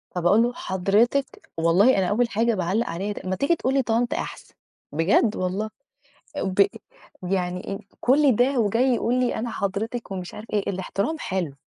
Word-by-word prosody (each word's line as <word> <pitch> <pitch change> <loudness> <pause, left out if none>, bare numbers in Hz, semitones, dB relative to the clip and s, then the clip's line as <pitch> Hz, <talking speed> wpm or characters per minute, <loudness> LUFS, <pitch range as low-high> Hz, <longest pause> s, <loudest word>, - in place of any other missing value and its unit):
فباقول 180 +6 +4
له: 245 +1 0
"حضرتِك!"، 210 +10 0
والله 180 +10 +4
أنا 190 -2 +2
أول 235 +4 +1
حاجة 230 +2 +1
باعلَّق 190 +5 0
عليها 195 +5 -3
د 185 - -8
"ما 185 - 0
تيجي 280 - +2
تقول 265 -4 -1
لي 275 - +3
طنط 235 +1 0
أحسن! - - -6 0.4
بجد 185 - +2
والله". 190 +4 -2 0.7
آآ - - -2
وب 195 +1 +3 0.7
يعني 180 -1 -1
إيه 195 0 -4 0.2
كل 270 -1 +4
ده 250 +1 +2
وجاي 235 +5 +2
يقول 235 +1 0
لي 250 - +1
أنا 235 +1 -3
حضرتِك 215 +3 -3
ومش 185 -2 -6
عارف 215 - -9
إيه، 205 -2 0
الاحترام 200 - -2
حلو، 185 - -3
210 Hz, 175 wpm, -24 LUFS, 185-245 Hz, 0.7 s, فباقول